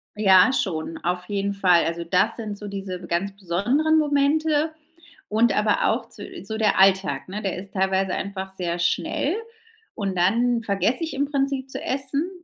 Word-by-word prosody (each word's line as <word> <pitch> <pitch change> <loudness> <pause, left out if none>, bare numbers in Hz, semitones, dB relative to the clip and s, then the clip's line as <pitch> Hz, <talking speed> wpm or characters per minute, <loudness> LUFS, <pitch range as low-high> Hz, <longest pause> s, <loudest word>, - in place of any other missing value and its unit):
Ja, 195 +1 +6
schon, 165 -10 -2
auf 180 +1 -1
jeden 200 0 -1
Fall. 180 -3 +3
Also 170 +1 -2
das 185 +6 +1
sind 215 -3 -5
so 205 - -7
diese 195 -2 -5
be 175 - -10
ganz 185 +4 -1
besonderen 210 - +1
Momente 300 +1 +2 0.6
und 225 +2 +3
aber 210 0 +2
auch 230 +1 -1
zu 205 - -9 0.2
so 220 +2 -4
der 215 -2 +2
Alltag, 190 -7 +3
ne? 205 +3 -5
Der 195 -3 -2
ist 195 +2 -8
teilweise 190 0 +1
einfach 190 -1 -4
sehr 175 -1 -2
schnell 180 - 0 0.6
und 195 -3 -3
dann 230 +6 +2
vergesse 225 - 0
ich 325 - -4
im 280 +1 0
Prinzip 275 -1 -1
zu - - -6
essen. 275 +5 -1
200 Hz, 175 wpm, -23 LUFS, 185-255 Hz, 0.6 s, Ja